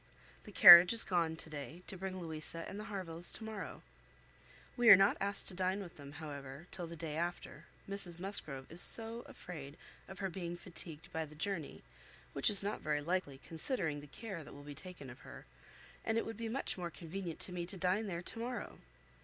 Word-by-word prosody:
The 210 Hz, -, -12 dB
carriage 175 Hz, 0 st, +9 dB
is 230 Hz, -, 0 dB
gone 170 Hz, -3 st, -1 dB
to 160 Hz, -, -5 dB
day, 150 Hz, +3 st, -9 dB
to -, -, -6 dB
bring 185 Hz, 0 st, -6 dB
Louisa 165 Hz, 0 st, -5 dB
and 200 Hz, -, -8 dB
the 215 Hz, -, -8 dB
Harvilles 175 Hz, -5 st, -4 dB
to -, -, -5 dB
morrow. 220 Hz, -2 st, -8 dB, 0.9 s
We 240 Hz, -2 st, +3 dB
are 200 Hz, -, +12 dB
not 195 Hz, +1 st, +3 dB
asked 200 Hz, 0 st, -2 dB
to -, -, -10 dB
dine 185 Hz, +2 st, -2 dB
with 180 Hz, -4 st, -10 dB
them, 140 Hz, -1 st, -12 dB
however, 145 Hz, -1 st, -9 dB
till 175 Hz, -2 st, -5 dB
the 170 Hz, -, -9 dB
day 160 Hz, -2 st, -7 dB
after, 170 Hz, -2 st, -6 dB, 0.2 s
Mrs 195 Hz, -4 st, -3 dB
Musgrove 155 Hz, -8 st, -3 dB
is 170 Hz, +2 st, +12 dB
so 230 Hz, +1 st, +9 dB
afraid 150 Hz, -4 st, -11 dB, 0.3 s
of 190 Hz, -, -11 dB
her 195 Hz, -1 st, -4 dB
being 175 Hz, -1 st, -6 dB
fatigued 165 Hz, -3 st, -9 dB
by 160 Hz, 0 st, -3 dB
the 155 Hz, 0 st, -15 dB
journey, 165 Hz, 0 st, -5 dB, 0.5 s
which 140 Hz, -, +1 dB
is 200 Hz, -2 st, +2 dB
not 205 Hz, +1 st, -4 dB
very 150 Hz, -1 st, -2 dB
likely, 165 Hz, -4 st, -3 dB
considering 160 Hz, -, -3 dB
the 145 Hz, -, -13 dB
care 190 Hz, +1 st, -9 dB
that -, -, -14 dB
will 145 Hz, -, -13 dB
be 145 Hz, 0 st, -10 dB
taken 180 Hz, -2 st, -11 dB
of 125 Hz, -, -15 dB
her; -, -, -13 dB, 0.6 s
and 225 Hz, -, -2 dB
it -, -, -1 dB
would 225 Hz, -, -7 dB
be 230 Hz, 0 st, -5 dB
much 240 Hz, -5 st, -4 dB
more 175 Hz, -1 st, -5 dB
convenient 170 Hz, 0 st, -8 dB
to -, -, -1 dB
me 175 Hz, -1 st, -5 dB
to 190 Hz, +2 st, -6 dB
dine 190 Hz, +4 st, -1 dB
there 175 Hz, -2 st, -6 dB
to 225 Hz, -, -6 dB
morrow. 245 Hz, +1 st, -6 dB
175 Hz, 210 wpm, -34 LUFS, 155-195 Hz, 0.9 s, are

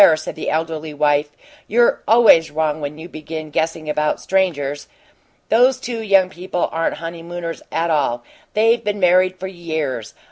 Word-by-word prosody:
said 155 Hz, -, -6 dB
the 160 Hz, -, -4 dB
elderly 160 Hz, -1 st, -3 dB
wife. 145 Hz, 0 st, +2 dB, 0.4 s
"You're 235 Hz, +3 st, +3 dB
always 220 Hz, -8 st, +6 dB
wrong 155 Hz, 0 st, -1 dB
when 145 Hz, +1 st, -5 dB
you 160 Hz, +2 st, -9 dB
begin 155 Hz, -1 st, -7 dB
guessing 160 Hz, +1 st, -2 dB
about 150 Hz, 0 st, 0 dB
strangers. 145 Hz, -7 st, -1 dB, 0.6 s
Those 255 Hz, +3 st, +4 dB
two 235 Hz, -3 st, -4 dB
young 195 Hz, -3 st, +4 dB
people 180 Hz, -1 st, -3 dB
aren't 165 Hz, 0 st, -1 dB
honeymooners 170 Hz, +1 st, -6 dB
at 165 Hz, +1 st, 0 dB
all 135 Hz, -6 st, 0 dB, 0.3 s
they've 225 Hz, +2 st, +3 dB
been 205 Hz, -1 st, -2 dB
married 185 Hz, 0 st, +3 dB
for 190 Hz, -, -5 dB
years. 160 Hz, -, -4 dB
165 Hz, 150 wpm, -19 LUFS, 155-190 Hz, 0.6 s, always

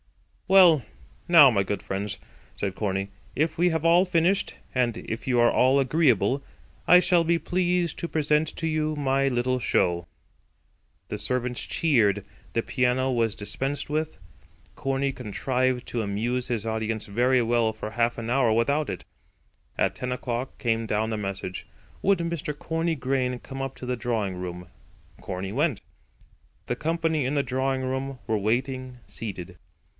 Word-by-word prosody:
"Well, 180 Hz, -8 st, +7 dB, 0.5 s
now, 160 Hz, -6 st, +9 dB
my 100 Hz, -4 st, +2 dB
good 100 Hz, +1 st, -3 dB
friends," 100 Hz, +1 st, -4 dB, 0.4 s
said 95 Hz, -2 st, -2 dB
Corney, 95 Hz, -1 st, -2 dB, 0.3 s
"if 160 Hz, +1 st, 0 dB
we 175 Hz, +2 st, +4 dB
have 160 Hz, -1 st, -1 dB
all 170 Hz, +2 st, +6 dB
finished, 180 Hz, +1 st, +1 dB, 0.2 s
and 120 Hz, -3 st, +1 dB
if 110 Hz, +1 st, -6 dB
you 125 Hz, -2 st, +2 dB
are 120 Hz, 0 st, +5 dB
all 130 Hz, +2 st, +4 dB
agreeable, 135 Hz, -, +2 dB, 0.4 s
I 180 Hz, -, +9 dB
shall 180 Hz, -1 st, +3 dB
be 170 Hz, +1 st, +2 dB
pleased 180 Hz, -2 st, 0 dB
to 170 Hz, -, -3 dB
present 150 Hz, 0 st, +2 dB
to 165 Hz, -, -1 dB
you 155 Hz, -1 st, 0 dB
my 135 Hz, -1 st, +2 dB
little 125 Hz, 0 st, 0 dB
show." 85 Hz, -5 st, +1 dB, 1.0 s
The -, -, -4 dB
servants 125 Hz, -1 st, -2 dB
cheered. 105 Hz, -, +2 dB, 0.3 s
The 115 Hz, -, 0 dB
piano 130 Hz, 0 st, +1 dB
was 115 Hz, -3 st, +1 dB
dispensed 135 Hz, +8 st, -3 dB
with. 155 Hz, +1 st, -2 dB, 0.6 s
Corney 135 Hz, 0 st, -1 dB
contrived 125 Hz, +2 st, -1 dB
to 120 Hz, -, -1 dB
amuse 115 Hz, +5 st, -1 dB
his 115 Hz, -3 st, -2 dB
audience 110 Hz, -1 st, -2 dB
very 125 Hz, +5 st, +2 dB
well 115 Hz, -1 st, +2 dB
for 110 Hz, 0 st, -7 dB
half 120 Hz, +1 st, 0 dB
an 115 Hz, 0 st, -4 dB
hour 125 Hz, -2 st, +3 dB
without 140 Hz, +7 st, +1 dB
it. -, -, -5 dB, 0.7 s
At -, -, +1 dB
ten 125 Hz, 0 st, -4 dB
o'clock 125 Hz, 0 st, -3 dB
came 115 Hz, -1 st, 0 dB
down 110 Hz, +1 st, 0 dB
a -, -, -1 dB
message: 95 Hz, -2 st, -5 dB, 0.4 s
Would 200 Hz, 0 st, +3 dB
Mr. 170 Hz, -3 st, -3 dB
Corney 165 Hz, +1 st, -1 dB
Grain 130 Hz, -2 st, -1 dB
come 135 Hz, +1 st, -7 dB
up 135 Hz, -, -4 dB
into -, -, -7 dB
the 125 Hz, 0 st, -1 dB
drawing 110 Hz, -5 st, -2 dB
room. 90 Hz, -1 st, -6 dB, 0.5 s
Corney 95 Hz, +1 st, -5 dB
went. 140 Hz, -3 st, +1 dB, 0.9 s
The 120 Hz, -, -2 dB
company 160 Hz, +1 st, 0 dB
in 130 Hz, +3 st, -1 dB
the 140 Hz, -, +2 dB
drawing 130 Hz, 0 st, -1 dB
room 130 Hz, +1 st, -3 dB
were 110 Hz, -, +1 dB
waiting, 130 Hz, +4 st, -1 dB
seated. 90 Hz, -5 st, -5 dB
125 Hz, 160 wpm, -26 LUFS, 110-150 Hz, 1.0 s, now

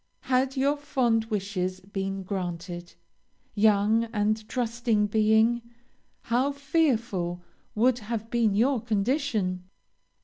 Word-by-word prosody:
Had 260 Hz, +1 st, 0 dB
your 280 Hz, +2 st, +2 dB
fond 250 Hz, -6 st, +1 dB
wishes 190 Hz, -4 st, -2 dB
been 195 Hz, 0 st, -4 dB
granted, 175 Hz, -2 st, -5 dB, 0.6 s
young 215 Hz, +2 st, +3 dB
and 215 Hz, -1 st, -1 dB
trusting 235 Hz, -3 st, 0 dB
being, 220 Hz, +3 st, +3 dB, 0.6 s
how 255 Hz, +5 st, 0 dB
fearful 235 Hz, -, 0 dB, 0.3 s
would 245 Hz, +3 st, +3 dB
have 225 Hz, 0 st, -5 dB
been 230 Hz, -4 st, +2 dB
your 245 Hz, +3 st, +2 dB
condition! 215 Hz, -, -1 dB
220 Hz, 100 wpm, -27 LUFS, 195-245 Hz, 0.6 s, young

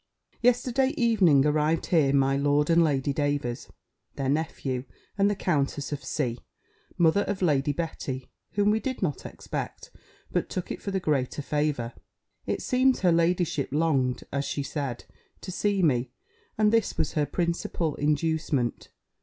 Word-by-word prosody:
Yesterday 250 Hz, +2 st, +2 dB
evening 190 Hz, -, +4 dB
arrived 150 Hz, +2 st, +1 dB
here 155 Hz, -6 st, +3 dB
my 135 Hz, -1 st, +3 dB
Lord 145 Hz, +2 st, +2 dB
and 170 Hz, 0 st, +5 dB
Lady 140 Hz, -2 st, +1 dB
Davers, 145 Hz, -4 st, -2 dB, 0.5 s
their 135 Hz, -1 st, -2 dB
nephew, 140 Hz, -4 st, -1 dB, 0.3 s
and 200 Hz, 0 st, +3 dB
the 205 Hz, -, 0 dB
Countess 145 Hz, -6 st, -1 dB
of 145 Hz, -1 st, -4 dB
C., 125 Hz, -5 st, -2 dB, 0.6 s
mother 170 Hz, +4 st, +4 dB
of 195 Hz, -2 st, -2 dB
Lady 145 Hz, -3 st, +2 dB
Betty, 145 Hz, -4 st, -4 dB, 0.3 s
whom 205 Hz, 0 st, +3 dB
we 220 Hz, -, +2 dB
did 260 Hz, -2 st, -3 dB
not 150 Hz, -6 st, -2 dB
expect, -, -, -6 dB, 0.4 s
but -, -, -1 dB
took 185 Hz, -, -4 dB
it -, -, -5 dB
for -, -, -4 dB
the 195 Hz, -1 st, 0 dB
greater 145 Hz, -4 st, -1 dB
favour. 145 Hz, -5 st, -1 dB, 0.5 s
It -, -, -2 dB
seems 255 Hz, 0 st, +2 dB
her 180 Hz, -2 st, +4 dB
ladyship 170 Hz, -3 st, +1 dB
longed, 140 Hz, -5 st, +1 dB
as 140 Hz, 0 st, -1 dB
she 145 Hz, -, -3 dB
said, 140 Hz, -4 st, -4 dB, 0.4 s
to 185 Hz, -, -6 dB
see 200 Hz, 0 st, 0 dB
me; 125 Hz, -5 st, +2 dB, 0.5 s
and 215 Hz, 0 st, +3 dB
this 225 Hz, -2 st, +1 dB
was 155 Hz, -, 0 dB
her 150 Hz, -2 st, +1 dB
principal 170 Hz, -2 st, -1 dB
inducement. 150 Hz, -4 st, 0 dB
155 Hz, 155 wpm, -27 LUFS, 140-185 Hz, 0.6 s, and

